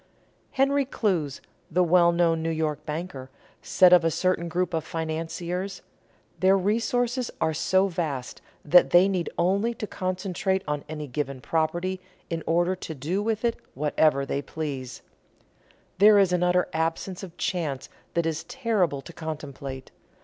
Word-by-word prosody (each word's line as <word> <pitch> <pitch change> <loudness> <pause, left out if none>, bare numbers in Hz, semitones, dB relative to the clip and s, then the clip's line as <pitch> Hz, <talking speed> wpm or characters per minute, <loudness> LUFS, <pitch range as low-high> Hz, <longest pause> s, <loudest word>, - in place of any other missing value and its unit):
Henry 275 +1 +3
Clews, 180 - -1 0.3
the 180 +3 +2
well 170 0 +5
known 170 -1 +2
New 165 - -1
York 155 -2 -2
banker, 150 -4 -5 0.3
said 180 -1 +5
of 175 -2 +7
a 165 - +3
certain 170 +1 0
group 180 +2 -1
of 160 -1 0
financiers: 165 +3 -4 0.6
"Their 190 +1 +5
resources 235 +5 0
are 160 - +1
so 185 +5 +2
vast 155 -8 -4 0.2
that 175 +4 +6
they 175 +2 +6
need 185 -3 -1
only 200 +7 +1
to 215 - -4
concentrate 190 0 -2
on 150 -1 -2
any 155 -1 -5
given 140 0 -4
property 175 +6 -1 0.3
in 165 -1 -2
order 175 +3 +2
to 160 -3 -7
do 160 +9 -2
with 220 +1 -1
it 235 - +1 0.2
what 150 +2 -2
they 140 -2 +2
please.... 140 -4 -6 1.0
There 210 +1 +8
is 195 -3 +4
an 180 - +1
utter 180 0 +2
absence 165 +3 -2
of 185 -4 -10
chance 150 -7 -2 0.3
that 170 -1 +1
is 160 -1 -2
terrible 200 - 0
to 170 - -11
contemplate. 140 -4 -7
170 Hz, 150 wpm, -26 LUFS, 155-190 Hz, 1.0 s, There